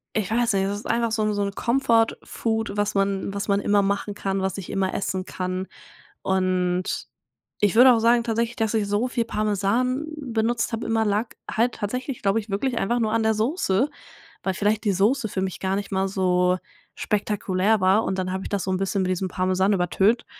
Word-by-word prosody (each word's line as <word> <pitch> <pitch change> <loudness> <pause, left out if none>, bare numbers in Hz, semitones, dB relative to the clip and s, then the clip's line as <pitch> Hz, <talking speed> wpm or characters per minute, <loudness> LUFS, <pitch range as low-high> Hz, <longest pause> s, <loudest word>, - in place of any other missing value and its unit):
ich 215 -2 -1
weiß 235 -1 +2
nicht, 195 0 +2
das 200 +1 -2
ist - - -13
einfach 235 -1 0
so 220 -1 0
'n 215 -1 +1
so 205 - 0
'n 200 0 -2
Comfort-Food, 230 -2 0
was 205 0 0
man 195 0 0
was 200 - -3
man 200 0 +2
immer 205 0 +3
machen 200 +1 -1
kann, 195 -1 -2
was 190 -1 -1
ich 190 - -7
immer 190 -1 -1
essen 190 -1 -2
kann. 185 0 -4 0.5
Und 185 -1 0 0.5
ich 205 -1 +2
würde 250 +2 +8
auch 230 - +2
sagen 235 +1 +4
tatsächlich, 230 +1 -1
dass 225 -1 -1
ich 210 -2 +1
so 205 +5 +1
viel 240 -2 -1
Parmesan 215 +7 0
benutzt 240 -5 -1
habe 225 - -3
immer, 225 -1 +1
lag 210 +3 +1 0.2
halt 235 +2 +1
tatsächlich, 250 +5 -4
glaube 200 +3 +2
ich, 215 -1 -9
wirklich 235 +5 -1
einfach 240 +4 0
nur 220 -2 0
an 230 - +2
der 220 - +3
Soße, 235 - +1 0.5
weil 190 - -1
vielleicht 210 +2 +1
die 200 - +3
Soße 220 +6 +2
für 190 -2 -3
mich 190 -1 -3
gar 190 0 -1
nicht 200 0 -4
mal 190 0 +1
so 180 -1 +2 0.4
spektakulär 210 0 0
war. 190 +4 +4
Und 190 - -2
dann 185 0 -2
habe 190 0 -3
ich - - -6
das 200 -2 -1
so 190 - -2
'n 185 - +1
bisschen 195 +1 -1
mit 185 - 0
diesem 185 +1 -1
Parmesan 185 +2 +1
übertönt. 195 +5 +2
205 Hz, 210 wpm, -24 LUFS, 190-225 Hz, 0.5 s, würde